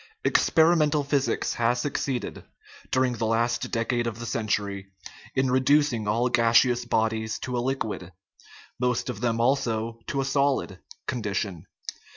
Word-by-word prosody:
Experimental 160 -2 +3
physics 140 -1 0
has 120 +1 +1
succeeded, 135 -1 -3 0.5
during 130 -1 +2
the 115 -1 -2
last 115 +1 0
decade 120 +1 0
of 115 -2 -4
the 115 - -6
century, 105 -4 -2 0.5
in 130 -1 +2
reducing 130 -3 +2
all 115 +4 +2
gaseous 120 +1 +3
bodies 110 -1 0
to 125 - -4
a 120 - 0
liquid 115 -8 -3 0.7
most 125 0 0
of 110 -3 -9
them, 115 -2 0
also, 115 -3 0
to 140 - -2
a 135 - 0
solid 140 0 0 0.3
con 125 -3 -3
dition. 100 -5 -3
120 Hz, 140 wpm, -26 LUFS, 115-130 Hz, 0.7 s, Experimental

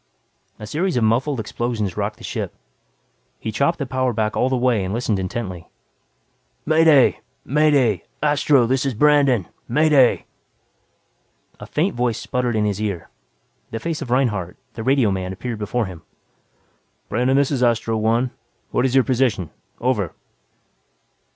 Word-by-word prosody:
A 105 - -8
series 165 - -1
of 120 - +2
muffled 125 +5 +1
explosions 110 -3 -3
rocked - - -3
the - - -15
ship. - - -4 0.8
He 110 - -4
chopped 140 +10 +1
the 140 - -3
power 130 -1 -1
back 110 -1 -1
all 130 - +2
the 130 - +1
way 120 -5 +2
and 95 +3 -3
listened 115 -4 0
intently. 95 -2 -5 1.0
"May 160 +1 +4
Day! 145 -6 +5 0.3
May 150 +3 +3
Day! 120 - +2 0.2
Astro, 145 -3 +3
this 130 +2 +1
is 135 -4 -1
Brandon. 140 - +3 0.2
May 155 +6 +2
Day!" 135 -5 +4 1.3
A - - -9
faint - - 0
voice 120 -2 0
sputtered 125 -2 -2
in 105 -1 +1
his 105 0 -1
ear, 95 -6 -4 0.6
the 115 - -4
face 160 +5 -3
of 135 - -6
Reinhardt, 110 -9 0 0.2
the 115 - -6
radioman 105 -8 +1
appeared 115 +3 -5
before 110 +3 -1
him. 90 -4 -9 1.1
"Brandon, 125 +4 +1
this 140 0 +2
is 135 -3 -1
Astro 115 -2 +1
One. 115 +3 +1 0.4
What - - +1
is 130 0 0
your 135 - +6
position? 120 - 0 0.3
Over." 115 -8 -1
120 Hz, 155 wpm, -21 LUFS, 110-135 Hz, 1.3 s, your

